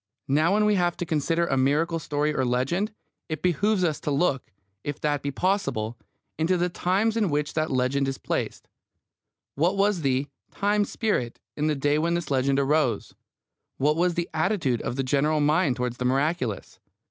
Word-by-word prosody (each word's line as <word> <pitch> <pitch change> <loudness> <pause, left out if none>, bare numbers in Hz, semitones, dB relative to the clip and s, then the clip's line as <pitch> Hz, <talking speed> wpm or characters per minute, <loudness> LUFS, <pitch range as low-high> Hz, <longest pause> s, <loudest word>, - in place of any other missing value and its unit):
Now, 155 +7 +3
when 210 0 +3
we 210 - +4
have 175 -3 +1
to 175 - -3
consider 165 +2 +1
a 135 -5 0
miracle 155 +6 +2
story 150 0 -1
or 135 - 0
a - - +1
legend, 135 - 0 0.4
it 155 - -4
behoves 185 +3 +2
us 160 -4 0
to - - -3
look, 140 -2 0 0.3
if 145 -1 -4
that 145 -1 0
be 140 - -2
possible, 140 - -1 0.4
into 175 +3 +2
the 175 +1 +1
times 195 +6 +1
in 215 -5 +1
which 150 0 -1
that 155 0 0
legend 130 +2 +1
is 135 0 -2
placed. - - -3 0.9
What 175 +7 +1
was 200 -3 +2
the 135 -1 +1 0.2
"time 205 +1 +1
spirit" 200 - -2 0.2
in 150 +1 0
the 155 - +1
day 145 +2 +1
when 170 +2 +1
this 170 -4 -3
legend 135 0 +2
arose? 140 -2 +1 0.6
What 150 +3 +2
was 175 +1 +1
the 170 0 -1
attitude 160 - 0
of - - -3
the 135 - -1
general 145 +4 +1
mind 150 -1 +2
towards 125 -1 -3
the 125 - -3
miraculous? 135 - -1
155 Hz, 185 wpm, -26 LUFS, 135-175 Hz, 0.9 s, we